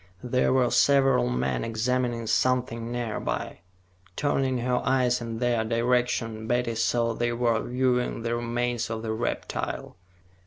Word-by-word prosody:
There 125 +1 +1
were 130 -2 +3
several 135 - +4
men 60 0 -1
examining 120 +1 -1
something 120 -1 0
nearby. 120 -2 -3 0.6
Turning 135 -3 0
her 125 +1 0
eyes 125 -1 +2
in 115 -1 -4
their 120 -1 +1
direction, 115 -1 0
Betty 120 0 0
saw 115 +1 +1
they 120 +1 -1
were 120 -2 +1
viewing 125 -2 0
the 115 0 -1
remains 120 0 -1
of 115 0 -4
the 110 -1 -2
reptile. 110 -4 -3
120 Hz, 130 wpm, -26 LUFS, 115-125 Hz, 0.6 s, several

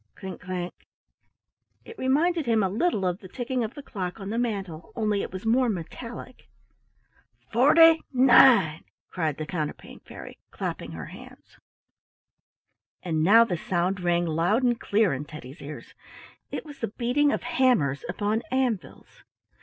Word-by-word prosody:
clink 190 -2 -8
clank! 180 -1 -4 1.1
It 460 - -11
reminded 305 - +1
him 225 -3 +3
a 190 - +1
little 210 - 0
of 180 +1 -1
the 190 - -11
ticking 250 +4 -3
of 220 +2 -5
the 290 - -9
clock 185 -5 -5
on 195 +1 -6
the 230 - -1
mantle, 195 -9 -4
only 210 -3 0
it - - -5
was 185 +3 -7
more 245 +2 +3
metallic. 230 +7 -7 1.0
"FORTY 320 +7 +6
NINE!" 245 - +6 0.3
cried 160 -5 -2
the 155 - -4
Counterpane 155 -2 -5
Fairy, - - -11
clapping - - -5
her - - -7
hands. - - -14 1.4
And 160 -3 -1
now 220 +7 +7
the 185 -7 -2
sound 180 +3 -1
rang 175 -1 +1
loud 170 +9 +1
and 240 -2 +2
clear 205 -5 +2
in 135 +2 -4
Teddy's 145 -1 -11
ears; 140 -4 -9 0.6
it - - -5
was 290 -2 -11
the 230 - -2
beating 250 +7 +1
of - - -2
hammers 240 - +1
upon 210 +4 -1
anvils. 255 -7 -3
210 Hz, 150 wpm, -26 LUFS, 175-250 Hz, 1.4 s, now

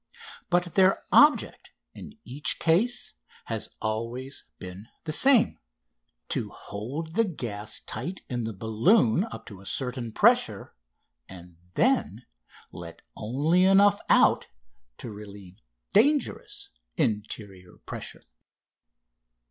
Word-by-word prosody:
But 175 -1 +1
their 190 0 +4
object 295 0 +4 0.2
in 215 - -11
each 135 +4 -2
case 195 +10 +1 0.3
has - - -3
always 115 +5 -4
been 95 +3 -9 0.2
the 155 - -4
same: 260 - +4 0.7
to - - -1
hold 135 +11 -7
the 230 - +3
gas 115 - -4
tight 170 +12 -5
in 120 -3 -3
the 110 - -4
balloon 115 - +3
up 230 - -9
to 100 -5 -11
a - - -15
certain 125 -3 -2
pressure - - +2 0.6
and 90 -2 -13 0.2
then - - +1 0.5
let 85 -1 -10
only 145 +11 +1
enough 200 +2 +5
out - - +4 0.5
to 115 - -7
relieve 100 -3 -11 0.3
dangerous 295 0 +1 0.3
interior 100 -4 -3
pressure. - - -5
125 Hz, 110 wpm, -27 LUFS, -, 0.7 s, enough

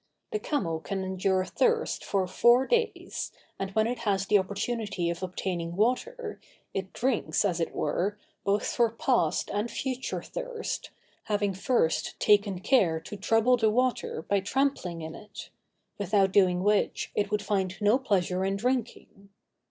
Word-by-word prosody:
The 430 - -1
camel 175 - -1
can 195 +3 -3
endure 190 0 0
thirst 460 - +1
for 195 -2 0
four 240 +7 +4
days, 465 - -1 0.3
and 195 - -2
when 220 0 +4
it 245 +2 -2
has 195 -3 0
the 205 0 +5
opportunity 200 -2 -2
of 170 - -6
obtaining 175 -2 -3
water, 425 - -1 0.3
it 190 -1 -3
drinks, 250 -4 0
as 180 -4 0
it 165 - -1
were, 205 +4 -1 0.3
both 200 +1 +1
for 235 -1 +2
past 230 - +1
and 205 +3 -1
future 260 0 -3
thirst, - - -5 0.4
having 205 -2 0
first 190 -3 0
taken 200 -3 +3
care 185 -10 +3
to 205 - -8
trouble 225 +5 +3
the 220 -2 +3
water 250 -7 0
by 200 +3 +1
trampling 195 - -1
in 160 0 -6
it; 210 +3 -10 0.5
without 195 -1 +2
doing 185 -2 +4
which, 210 0 +1
it 205 -1 0
would 210 -1 -1
find 190 -2 -1
no 210 +5 +4
pleasure 185 -6 0
in 195 +1 0
drinking. 230 -3 -3
205 Hz, 150 wpm, -28 LUFS, 190-240 Hz, 0.5 s, the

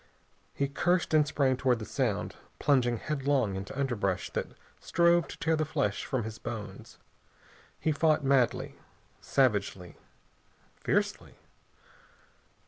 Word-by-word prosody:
He 140 - 0
cursed, 175 +5 0
and 150 -1 +5
sprang 135 -3 +1
toward 130 -2 +2
the 110 - -6
sound, - - -1 0.2
plunging 125 -4 +2
headlong 140 -6 0
into 95 +8 -6
underbrush 105 -9 -1
that - - -2 0.3
strove 170 -2 +3
to - - -9
tear 165 0 +1
the 155 - 0
flesh 105 -9 -1
from 130 -3 -1
his 110 0 -7
bones. 105 -4 -7 0.8
He 160 - +1
fought 155 0 +2
madly, 135 -3 +1 0.4
savagely, 100 -8 0 0.8
fiercely. - - -1
135 Hz, 120 wpm, -29 LUFS, 110-150 Hz, 0.8 s, and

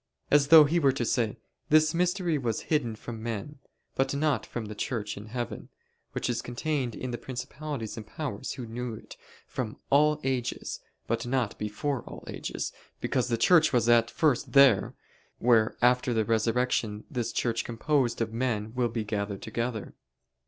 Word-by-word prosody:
As 145 -1 +5
though 160 0 +10
he 160 +4 +2
were 140 -4 +4
to 125 -3 -1
say: 115 -1 0 0.3
This 155 0 +5
mystery 175 -1 +1
was 115 -4 -1
hidden 120 -7 +1
from 115 0 -8
men, 115 +6 -5 0.3
but 135 +1 0
not 150 0 +1
from 120 -2 -5
the 105 - -6
Church 105 -1 -3
in 105 +2 -9
heaven, 120 0 -5 0.4
which - - -2
is 120 -1 -1
contained 125 -1 -2
in 130 - -4
the 120 - -4
principalities 130 -2 -5
and 110 - -7
powers 135 -6 -4
who 125 - -6
knew 115 0 -5
it - - -12 0.3
"from 115 -4 -4
all 150 +2 +4
ages, 130 -2 -2 0.3
but 115 +1 -2
not 125 -4 0
before 120 +6 -2
all - - -10
ages: - - -4 0.3
because 125 -3 0
the 120 -2 0
Church 160 +5 +5
was 120 -3 +2
at 115 -1 +5
first 150 -6 +1
there, 135 -7 +6 0.4
where 115 -2 +3
after 125 0 +3
the 110 -1 +2
resurrection 115 -1 0
this 120 -5 -2
Church 115 -1 0
composed 120 +1 0
of 110 -1 -1
men 115 -3 -1
will 125 -1 +1
be 115 -1 -2
gathered 100 -2 -3
together." 115 -1 -3
120 Hz, 170 wpm, -28 LUFS, 115-140 Hz, 0.4 s, though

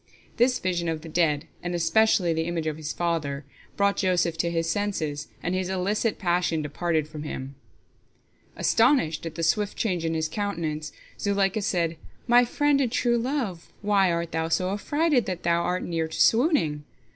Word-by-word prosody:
This 250 +1 +3
vision 175 -5 -1
of 160 -1 -3
the 165 - -9
dead, 155 -2 +1 0.2
and 175 0 -3
especially 175 +1 +3
the 160 0 -1
image 170 -2 -2
of 155 -1 -2
his 155 -1 -4
father, 155 -5 -2 0.3
brought 200 0 +2
Joseph 175 -3 +1
to 170 - +1
his 165 -1 -1
senses, 160 -7 -2 0.2
and 175 - -1
his 185 0 -1
illicit 200 +4 0
passion 175 -3 0
departed 155 +1 -1
from 155 -1 -8
him. 135 -2 -6 1.0
Astonished 225 - +2
at 160 - -7
the 165 - -3
swift 205 +5 +1
change 180 -7 -1
in 165 0 -1
his 160 0 0
countenance, 155 -5 -3 0.3
Zuleika 200 0 +1
said, 170 -5 0 0.3
"My 245 0 +5
friend 290 +3 +2
and 250 -4 0
true 240 -1 +2
love, 235 - -3
why 200 -3 +3
art 170 0 -2
thou 160 0 -1
so 185 +3 +1
affrighted 290 +5 +1
that 185 -2 -4
thou 170 0 +2
art 180 +1 -1
near 165 -2 -1
to 160 - -7
swooning? 225 - +3
175 Hz, 175 wpm, -26 LUFS, 160-205 Hz, 1.0 s, My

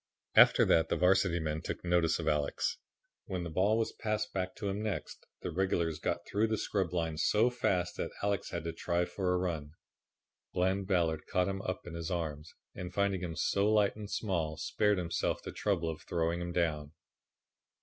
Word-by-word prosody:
After - - +7
that 80 0 +4
the - - +2
Varsity 90 -1 +3
men 80 -1 -2
took - - -5
notice 85 -2 +3
of 80 - -4
Alex. 75 -2 0 0.5
When 90 -2 -3
the 85 - -5
ball 100 +6 +3
was 115 - 0
passed 110 +3 -2
back 95 -1 -2
to 105 - -4
him 100 +1 -2
next 105 -3 -4 0.2
the - - -2
regulars 85 -3 0
got 85 +1 -2
through 105 +2 +1
the 110 0 0
scrub 95 -4 -1
line 80 -3 -1
so 110 +9 +3
fast 90 -7 0
that - - -2
Alex 100 -1 0
had 85 - -4
to 85 -1 -3
try 85 +1 0
for 90 0 -1
a 90 - +2
run. 80 -5 -3 0.8
Bland 95 +2 +1
Ballard 85 -5 +1
caught 90 0 +1
him 95 0 -2
up 95 - -4
in 85 - -8
his 85 -1 -4
arms, 80 -3 -4 0.2
and 90 0 -6
finding 100 -2 +1
him 85 -3 -4
so 100 +5 +2
light 105 -2 +3
and 105 -1 -7
small, 85 -9 -1
spared 105 +5 +1
himself 85 -2 -1
the - - -5
trouble 95 -5 0
of 80 -1 -4
throwing 85 +1 -1
him 85 0 -3
down. 80 -4 -1
90 Hz, 195 wpm, -32 LUFS, 80-100 Hz, 0.8 s, After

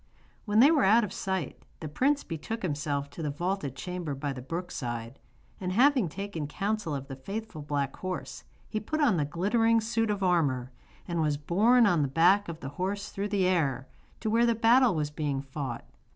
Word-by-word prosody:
When 210 +1 +4
they 285 +5 +7
were 300 -4 +3
out 225 +4 +5
of 210 - -4
sight 190 -7 -3 0.2
the 155 - -5
prince 275 - +1
betook 180 +7 -5
himself 145 -3 -2
to 165 - -8
the 150 - -1
vaulted 155 -2 -2
chamber 175 -2 -4
by 140 0 -3
the 130 - -7
brook 170 +7 -5
side, 120 0 -5 0.4
and 185 -1 -3
having 255 - +4
taken 185 -4 -5
counsel 200 -1 -2
of 135 -1 -6
the 135 - -6
faithful 195 +4 -6
black 145 -1 -2
horse, 185 -1 -5 0.2
he 215 - -2
put 310 +9 -3
on 255 - +3
the 150 - +1
glittering 225 +9 +2
suit 225 0 0
of 205 -2 -1
armour, 140 -9 +1 0.4
and 170 -2 -1
was 150 -2 +1
borne 220 +11 +4
on 175 -7 +3
the 140 - +1
back 175 +8 +3
of 165 -1 -7
the 135 - -5
horse 200 +2 -2
through 200 +1 -3
the 200 -2 +1
air, 140 -8 +1 0.3
to 220 - -1
where 235 +2 +4
the 235 - +2
battle 230 -1 +5
was 150 -1 -1
being 145 -2 -2
fought. 135 -3 -5
180 Hz, 200 wpm, -28 LUFS, 145-215 Hz, 0.4 s, they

